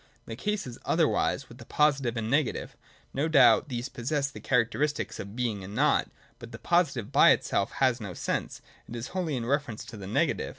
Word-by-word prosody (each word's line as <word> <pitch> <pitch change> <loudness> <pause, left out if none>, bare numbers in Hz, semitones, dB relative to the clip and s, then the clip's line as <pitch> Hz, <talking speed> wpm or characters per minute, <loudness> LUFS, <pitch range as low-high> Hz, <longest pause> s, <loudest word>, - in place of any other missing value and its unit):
The 115 - -6
case 210 - -2
is 125 -2 -9
otherwise - - +1
with - - -14
the - - -11
Positive 140 -6 +1
and 110 - -2
the 110 - -3
Negative. 145 -3 0 0.4
No 140 +4 0
doubt 155 -1 +5
these 120 0 -3
possess 135 +2 -2
the - - -10
characteristic 135 +4 0
of 100 +2 -7
Being 115 -5 -2
and 100 +3 -8
Nought. 145 +5 +2 0.3
But 115 - -10
the 115 - -8
positive 135 - 0
by - - +6
itself 100 - +1
has 125 -3 +1
no 100 -5 -6
sense; - - -3 0.3
it 120 - -7
is 120 +1 -5
wholly 175 -6 -2
in 115 - -3
reference 140 -3 -2
to 110 - -10
the 95 -2 -8
negative. 100 - 0
125 Hz, 205 wpm, -28 LUFS, 115-145 Hz, 0.4 s, by